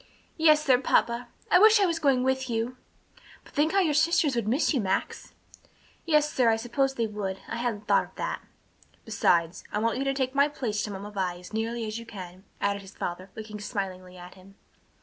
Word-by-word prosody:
"Yes, 305 -1 +5
sir. 255 -3 +5
Papa, 240 -2 +1 0.2
I 360 - +7
wish 435 +1 +7
I 400 - +4
was 335 -2 0
going 275 -5 +3
with 265 0 0
you!" 230 +2 -2 0.7
"But - - -18
think 300 +2 +2
how 395 - +4
your 320 -5 +2
sisters 305 -2 +3
would 235 -3 -1
miss 265 +8 +2
you, 260 - +1
Max." 190 -2 -2 0.7
"Yes, 300 -2 +3
sir, 245 -3 +3
I 225 - +4
suppose 265 +4 -1
they 230 - 0
would. 205 -3 -4
I - - -4
hadn't 230 -3 -3
thought - - +3
of - - -21
that." - - -3 0.6
"Besides, 175 -6 +1
I - - -2
want 230 +3 0
you - - 0
to 275 - +1
take 260 -1 -1
my 280 +1 +4
place 235 -8 -3
to 210 - -6
Mamma 200 +1 -7
Vi 185 -3 -2
as 180 +4 -13
nearly 225 +1 -2
as 215 +1 -4
you 230 - -11
can," 185 -2 -10
added 200 0 0
his 195 0 -14
father, 180 +2 -5
looking 215 -1 -7
smilingly 185 -4 -5
at 180 0 -11
him. 190 +1 -17
230 Hz, 210 wpm, -27 LUFS, 200-275 Hz, 0.7 s, I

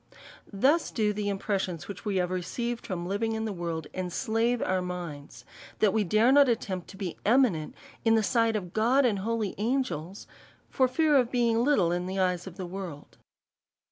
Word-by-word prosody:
Thus 275 +11 +2
do 210 -2 0
the 205 0 -2
impressions, 195 -4 -2
which 200 -2 -8
we 205 -2 -1
have 180 -1 0
received 235 +7 -3
from 175 -5 -3
living 210 +4 -1
in 220 0 -2
the 215 - -3
world, 170 -3 -4
enslave 225 +6 0
our 185 -3 0
minds, 175 -5 -7 0.3
that 210 -3 +3
we 220 -1 +2
dare 215 +7 +3
not 280 -1 +6
attempt 190 -6 -2
to 195 +1 -12
]je 190 -4 -5
eminent 215 - +2 0.3
in 225 -1 +4
the 220 - +3
sight 230 +1 +2
of 180 -4 -4
God, 250 +5 +3
and 210 -5 +1
holy 220 0 -2
angels, 210 - -2 0.5
for 260 - +3
fear 300 +4 +2
of 250 -4 +4
being 235 -2 +2
little 225 -12 +3
in 175 +1 -2
the 190 +1 -4
eyes 180 -1 0
of 180 - -10
the 185 - -4
world. 175 -5 -8
205 Hz, 185 wpm, -28 LUFS, 180-235 Hz, 0.5 s, not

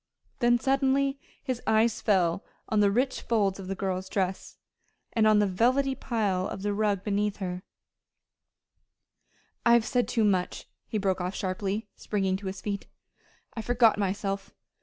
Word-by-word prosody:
Then 240 -1 +4
suddenly 275 +2 +1 0.2
his 255 -3 -3
eyes 220 +1 +3
fell 185 -4 +2 0.3
on 215 - +2
the 205 -1 +5
rich 250 +6 0
folds 200 -4 +1
of 190 - -7
the 195 - -3
girl's 190 -1 -3
dress, 190 -1 -2 0.6
and 220 -2 +3
on 215 -1 +5
the 210 - +4
velvety 250 +8 +2
pile 210 -8 -1
of 195 - -6
the 205 0 0
rug 205 -2 0
beneath 205 0 0
her 180 -2 -3
feet. 180 - -14 2.0
"I 235 - +5
have 235 -2 +4
said 245 0 +1
too 230 - +1
much," 190 -4 0 0.2
he 220 - -2
broke 190 -2 0
off 180 +2 -3
sharply, 195 +3 -2
springing 195 -3 -1
to 195 0 -7
his 190 0 -5
feet. 200 0 -4 0.7
"I 225 - -4
forgot 230 -2 +3
myself." 195 0 -2
205 Hz, 160 wpm, -28 LUFS, 190-235 Hz, 2.0 s, the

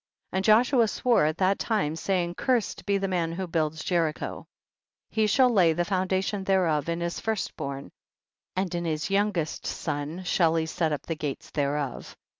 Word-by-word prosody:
23. - - -2
And 190 - -2
Joshua 230 +2 +5
swore 235 -4 +2
at 155 +1 -2
that 195 +1 +2
time, 205 -9 0
saying, 175 0 -1
cursed 245 +1 -1
be 200 0 +3
the 195 0 -1
man 170 -3 -1
who 190 +2 -3
builds 160 -2 -1
Jericho; 165 -4 -1 0.6
he 220 -1 +2
shall 250 +4 +4
lay 180 -7 +4
the 175 +2 0
foundation 190 +1 0
thereof 170 -6 +1
in 170 0 -2
his 170 0 -2
first 220 -3 -2
born, 140 -2 -5 0.6
and 185 -1 -1
in 170 0 -2
his 155 +2 -2
youngest 195 -5 0
son 150 +5 -3
shall 170 -2 +2
he 160 -1 +1
set 160 0 -1
up 150 - -2
the 165 - -2
gates 150 -3 -5
thereof. 145 -2 -2
175 Hz, 180 wpm, -27 LUFS, 160-195 Hz, 0.6 s, Joshua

